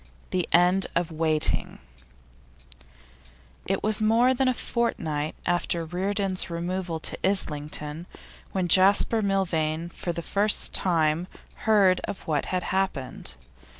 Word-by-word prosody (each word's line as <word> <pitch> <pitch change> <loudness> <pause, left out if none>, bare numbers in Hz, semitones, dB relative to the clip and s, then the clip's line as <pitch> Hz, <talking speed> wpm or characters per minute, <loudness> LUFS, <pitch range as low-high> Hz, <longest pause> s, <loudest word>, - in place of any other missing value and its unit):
THE 180 -3 -1
END 180 +2 +4
OF 170 -1 0
WAITING 155 -1 0 1.9
It 195 0 -1
was 215 0 +1
more 230 +4 +4
than 260 +1 +1
a 255 - +3
fortnight 155 -13 -2
after 175 -1 +2
Reardon's 190 +2 -1
removal 175 0 -3
to - - -4
Islington 150 -3 -1 0.4
when 185 -2 -1
Jasper 195 +5 +4
Milvain 170 -5 -1
heard - - -22
for 175 - -4
the 170 0 -5
first 205 +4 +1
time 165 -1 +2 0.4
of 200 -3 +2
what 150 -3 0
had 180 -1 -2
happened. 185 -9 -3
180 Hz, 115 wpm, -26 LUFS, 160-195 Hz, 1.9 s, END